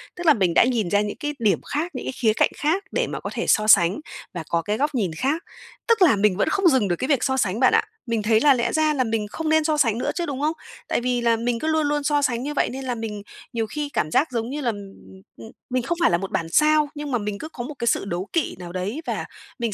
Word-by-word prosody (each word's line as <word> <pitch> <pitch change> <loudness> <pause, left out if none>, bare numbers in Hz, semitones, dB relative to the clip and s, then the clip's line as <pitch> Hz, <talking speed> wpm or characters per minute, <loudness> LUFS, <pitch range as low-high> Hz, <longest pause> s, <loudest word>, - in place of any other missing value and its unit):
Tức 350 - -7
là 310 - +8
mình 185 -8 +1
đã - - +6
nhìn 235 -7 0
ra 205 +2 +3
những 210 0 -4
cái 295 0 -3
điểm 205 -7 +2
khác, 320 +5 -3
những - - -5
cái - - -2
khía 220 -3 +2
cạnh - - +2
khác 330 +7 0
để - - 0
mà - - -5
có - - -5
thể - - -2
so 215 0 +3
sánh 195 - +5 0.3
và 170 -3 -5
có 170 0 +1
cái 210 +4 -2
góc 290 +2 -1
nhìn 195 -9 0
khác. 275 - -1 0.4
Tức 460 -3 +3
là 320 -11 +6
mình 200 -2 +2
vẫn - - +1
không 390 -2 +2
dừng 260 -10 +3
được 175 - 0
cái 260 - -3
việc 275 -4 +2
so 265 -1 +1
sánh 205 -2 0
bạn 255 - +4
ạ, - - +4 0.2
mình 230 -2 -1
thấy 220 +1 +3
là 290 0 +6
lẽ 235 -2 -1
ra 310 -1 +2
là 265 - +1
mình 225 -3 -2
không 310 +9 -4
nên 315 0 +4
so 305 0 +1
sánh 230 -7 +2
nữa - - -1
chứ, 345 - -1
đúng 280 -3 -4
không? 305 +2 +1 0.3
Tại - - 0
vì 245 0 0
là 235 -1 +3
mình 235 +1 -1
cứ 310 - -3
luôn 315 -2 +2
luôn 295 0 0
so 290 0 +2
sánh 250 -3 0
như 295 - -3
vậy, - - +1
nên 265 +2 -6
là 250 -1 -2
mình 220 -2 -5 0.3
nhiều 225 -2 -1
khi 295 +5 -4
cảm 155 - -1
giác, 295 -2 +2
giống 230 0 -2
như 295 +2 -4
là, 245 - 0
ừm, 215 - -3 0.3
ừm, 95 - -15 0.2
ừm, 115 - -11 0.2
mình 255 -1 0
không 340 +8 -2
phải - - +4
là 170 - +3
một 195 +2 -6
bản 165 -1 -2
sao, 305 - +3
nhưng 290 -1 -5
mà 245 - +2
mình 210 -2 -4
cứ 310 - -7
có 240 - -7
một 295 +5 -6
cái 235 - -2
sự 200 - +1
đố 180 +1 -4
kỵ 335 -4 0
nào 175 -1 -8
đấy, 190 - -4
và - - -2 0.3
mình 230 -3 -1
245 Hz, 305 wpm, -23 LUFS, 210-295 Hz, 0.4 s, là